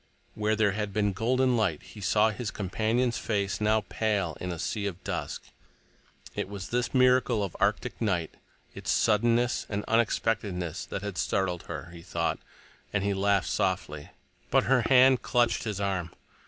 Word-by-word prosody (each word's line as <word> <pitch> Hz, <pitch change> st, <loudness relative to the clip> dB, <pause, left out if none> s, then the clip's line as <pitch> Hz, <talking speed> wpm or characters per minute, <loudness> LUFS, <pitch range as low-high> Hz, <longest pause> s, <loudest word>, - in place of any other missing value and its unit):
Where 105 Hz, 0 st, 0 dB
there 110 Hz, -2 st, +3 dB
had 105 Hz, 0 st, -3 dB
been 105 Hz, -1 st, +1 dB
golden 125 Hz, +5 st, +2 dB
light, 95 Hz, -10 st, 0 dB
he 105 Hz, -, -12 dB
saw 105 Hz, +3 st, +3 dB
his 110 Hz, 0 st, -4 dB
companion's 110 Hz, +5 st, 0 dB
face 100 Hz, -2 st, -1 dB
now 110 Hz, 0 st, +2 dB
pale 100 Hz, -7 st, -1 dB
in 90 Hz, -, -3 dB
a 85 Hz, -, -4 dB
sea 100 Hz, +5 st, -2 dB
of 95 Hz, -2 st, -6 dB
dusk. -, -, -4 dB, 0.9 s
It -, -, -3 dB
was 100 Hz, -2 st, -7 dB
this 120 Hz, 0 st, 0 dB
miracle 125 Hz, -4 st, +3 dB
of 95 Hz, -, -5 dB
arctic -, -, 0 dB
night, 90 Hz, -7 st, 0 dB, 0.4 s
its -, -, -7 dB
suddenness 120 Hz, +2 st, +2 dB
and 105 Hz, 0 st, -3 dB
unexpectedness, 105 Hz, -6 st, 0 dB
that 100 Hz, -, -5 dB
had 100 Hz, -4 st, -4 dB
startled 90 Hz, -3 st, -1 dB
her, 85 Hz, -, -6 dB
he 85 Hz, -1 st, -11 dB
thought, -, -, -2 dB, 0.5 s
and 105 Hz, -2 st, 0 dB
he 100 Hz, 0 st, +1 dB
laughed 100 Hz, 0 st, +1 dB
softly. 75 Hz, -1 st, -1 dB, 0.4 s
But -, -, +4 dB
her 130 Hz, -1 st, +3 dB
hand 130 Hz, +1 st, +5 dB
clutched 120 Hz, -3 st, +1 dB
his 105 Hz, -3 st, -3 dB
arm. 95 Hz, -4 st, -1 dB
105 Hz, 165 wpm, -28 LUFS, 95-115 Hz, 0.9 s, hand